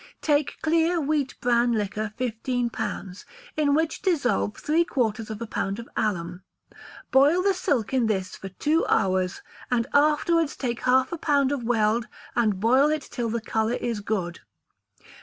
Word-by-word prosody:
Take 295 -1 +1
clear 330 +2 +2
wheat 290 -3 -1
bran 240 0 +3
liquor 210 0 -2
fifteen 245 0 -2
pounds, 190 -4 -5 0.3
in 290 -2 +2
which 320 +1 0
dissolve 280 - 0
three 320 +3 +2
quarters 225 -8 -1
of 215 -1 -5
a - - -4
pound 200 -2 -3
of 235 0 -8
alum; 180 -4 -2 0.7
boil 290 +7 +5
the 400 0 +3
silk 270 - -1
in 250 -4 +2
this 190 -4 -2
for 195 - -8
two 300 - +1
hours, 185 -1 +1 0.3
and 235 -2 +1
afterwards 305 +2 +3
take 240 -3 -3
half 260 +1 +3
a 335 - -4
pound 285 -3 +2
of 285 -3 -1
weld, 225 0 +1 0.3
and 215 -5 +1
boil 260 +7 +4
it 305 -2 -1
till 240 -2 -2
the 230 +1 -2
colour 220 +2 0
is 235 -4 -2
good. 190 -4 -3
245 Hz, 160 wpm, -25 LUFS, 215-295 Hz, 0.7 s, boil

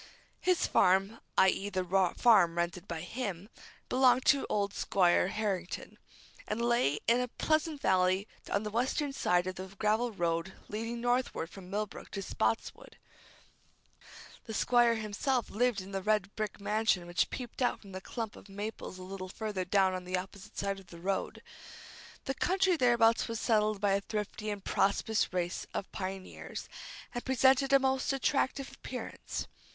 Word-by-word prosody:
His 365 -1 +2
farm 195 +4 +3 0.2
i.e., 190 +1 +4
the 185 -2 -1 0.3
farm 190 -8 +5
rented 170 0 -2
by 165 -2 -4
him 200 -1 -4 0.4
belonged 255 -1 +4
to 280 -2 +4
old 200 -1 0
Squire 180 -2 +3
Harrington, 195 -3 -3 0.5
and 210 - -2
lay 235 - +2
in 235 +2 +4
a 250 - 0
pleasant 310 +4 0
valley 185 +2 +2 0.2
on 200 - 0
the 210 - -4
western 265 +5 0
side 180 -8 +2
of 185 0 -4
the 185 +1 -5
gravel 220 +4 +1
road 170 -1 -1
leading 230 +3 -4
northward 245 -9 0
from 185 -2 -11
Millbrook 210 +1 -4
to 195 -1 -3
Spotswood. 225 - -2 1.5
The 220 - -5
Squire 240 0 +4
himself 220 +4 -1
lived 240 -1 +1
in 190 +1 -10
the 195 -1 -2
red 210 -1 0
brick 215 -1 -3
mansion 205 -3 +1
which 175 0 +1
peeped 250 0 -6
out 245 - +2
from 200 - -13
the 185 0 -6
clump 225 +1 -5
of 200 - -14
maples 205 -1 -6
a 185 - -9
little 185 0 -6
further 205 -2 -3
down 190 0 +3
on 185 0 -4
the 180 +1 -1
opposite 190 +1 -8
side 200 0 -1
of 190 - -16
the 170 - -11
road. 190 +3 -2 0.8
The 270 - -1
country 375 +4 +2
thereabouts 235 -5 +4
was 230 -1 -3
settled 215 -2 +2
by 205 -1 +2
a 200 +1 +2
thrifty 210 +1 -4
and 205 -2 -4
prosperous 210 +2 +1
race 175 -1 -2
of 195 - -4
pioneers, 190 0 -6 0.5
and 245 - -4
presented 265 +1 +4
a 275 - +8
most 265 +1 +1
attractive 270 0 0
appearance. 255 -1 -6
210 Hz, 160 wpm, -31 LUFS, 190-240 Hz, 1.5 s, a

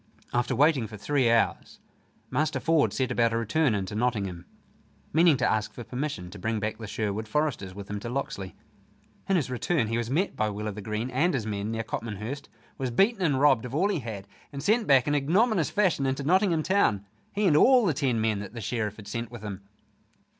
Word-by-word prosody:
After 125 +1 +1
waiting 140 -3 +3
for 105 0 -9
three 130 +4 +1
hours, 115 0 +1 0.5
Master 155 +1 0
Ford 165 -2 +2
set 130 -1 -1
about 115 -2 +2
a - - +1
return 115 +3 +1
into 95 -1 -3
Nottingham, 100 -7 -2 0.7
meaning 160 -2 +5
to 125 - +1
ask 110 -1 0
for 120 - -7
permission 125 -9 -4
to 105 - -10
bring 110 +3 -1
back 105 +2 -3
the 110 - -6
Sherwood 110 +1 -3
foresters 105 -8 -1
with 100 -1 -8
him 105 0 -4
to 120 - -6
Locksley. 120 -7 -4 0.7
In 195 - +4
his 145 -7 0
return 125 -1 0
he 115 +1 0
was 120 -1 -3
met 170 +9 0
by 110 - 0
Will 105 +1 -4
o' - - -2
th' 105 +1 -7
Green 110 +4 -3
and 155 +7 +2
his 115 -5 -2
men 105 -1 -3
near 115 0 -2
Copmanhurst, 110 +4 -5 0.3
was 130 -2 -1
beaten 195 - +2
and 145 -7 +2
robbed 145 -5 +4
of 125 +1 -6
all 190 +6 +2
he 190 -6 0
had, 110 -6 -7 0.2
and 140 -1 -6
sent 215 +5 +2
back 135 -1 +5
in 145 - +2
ignominious 175 - +2
fashion 185 -9 +1
into 135 +1 -1
Nottingham 175 0 +2
town 110 - +2 0.3
he 205 +1 0
and 165 -6 +4
all 250 - +6
the 170 - +2
ten 135 -5 0
men 110 -2 +1
that 105 +3 -8
the - - -5
Sheriff 105 -1 -2
had 105 -2 -12
sent 115 +2 -4
with 120 -3 -10
him! 100 -2 -6
120 Hz, 220 wpm, -27 LUFS, 105-150 Hz, 0.7 s, all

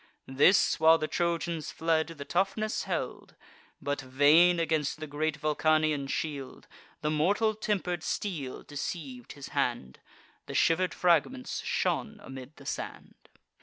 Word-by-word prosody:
This, 145 +10 +4
while 160 +1 +7
the 155 - -2
Trojans 170 -2 -1
fled, 160 -1 +1
the 155 -4 -8
toughness 195 +7 -1
held; - - -4 0.4
But, 145 +1 -2
vain 150 +7 +5
against 160 -3 0
the 155 - -4
great 155 +1 -2
Vulcanian 155 -1 +1
shield, 140 -2 -4 0.3
The 150 - 0
mortal 200 +8 +2
temper'd 195 -5 -2
steel 160 -9 -3
deceiv'd 140 -4 -6
his 140 -1 -9
hand: 65 0 -2 0.5
The - - -6
shiver'd 180 +2 +2
fragments 180 - +1
shone 220 -1 -1
amid 130 0 -10
the - - -15
sand. - - -6
155 Hz, 130 wpm, -29 LUFS, 145-175 Hz, 0.5 s, while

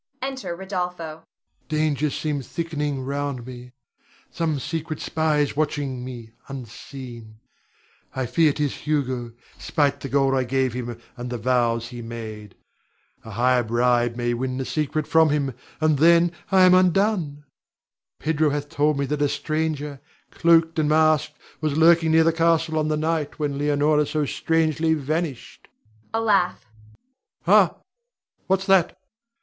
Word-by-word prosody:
Enter 260 -10 -4
Rodolpho.] 180 -4 -4
Rod. - - -26 0.4
Dangers 150 -2 0
seem 150 -3 -2
thickening 150 -1 -3
round 140 -2 -3
me. 125 0 -10 0.6
Some 160 -3 -1
secret 155 +2 -4
spy 155 -2 0
is 145 - -1
watching 145 -4 -2
me 120 -3 -8 0.2
unseen, 120 -3 -9 0.8
I 130 -1 -1
fear 155 +5 +3
'tis 145 -1 -1
Hugo, 130 -6 -1 0.3
spite 140 -2 0
the 135 - -6
gold 135 0 +2
I 130 -1 +2
gave 130 0 0
him, 120 -1 -5 0.2
and 125 -1 -6
the 120 - -3
vows 115 0 +1
he 120 -1 -8
made. 110 -3 -8 0.7
A - - -10
higher 125 +3 +2
bribe 120 +1 +1
may 120 0 -1
win 130 +1 -3
the 130 - -3
secret 155 +1 -1
from 160 -1 +4
him, 140 -3 0 0.3
and 155 -3 +2
then 170 +2 +5 0.2
I 190 -1 +6
am 185 0 +7
undone. 185 -5 +2 0.7
Pedro 155 0 +1
hath 145 0 -3
told 150 -1 +1
me 140 - 0
that 145 +1 -2
a 145 - +3
stranger, 150 -1 -2 0.3
cloaked 165 -1 +3
and 150 -1 +1
masked, 155 -2 +2 0.2
was 155 -2 -1
lurking 165 0 +5
near 160 0 +5
the 165 0 +3
castle 165 -1 +2
on 155 - 0
the 155 0 0
night 155 -1 -1
when 145 -2 -2
Leonore 150 +1 +2
so 150 0 -1
strangely 160 +1 +1
vanished 150 -2 -4 0.4
[a 225 - 0
laugh]. 200 -5 +1 0.8
Ha! - - +5 0.7
what's 190 0 +1
that? 190 -3 +3
150 Hz, 145 wpm, -23 LUFS, 130-160 Hz, 0.8 s, am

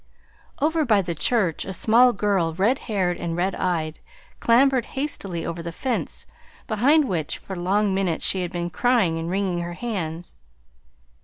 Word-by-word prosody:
Over 315 +2 +2
by 215 -7 +3
the 170 -1 -3
church 180 0 +1
a 190 - -6
small 235 +6 +5
girl, 195 -7 0
red 215 +9 +2
haired 185 -4 0
and 170 -1 -3
red 185 +2 0
eyed, 160 -4 -2 0.4
clambered 255 +1 +3
hastily 195 - -3
over 170 0 -4
the 170 0 -5
fence 250 +9 -3 0.4
behind 275 +8 +3
which 160 -5 -2
for 190 - -8
long 195 +3 +1
minutes 190 -4 0
she 190 - +1
had 175 -1 -3
been 175 -1 -3
crying 210 -6 +2
and 165 +1 -4
wringing 190 -1 -1
her 175 0 -4
hands. 175 -6 -5
190 Hz, 160 wpm, -23 LUFS, 170-230 Hz, 0.4 s, small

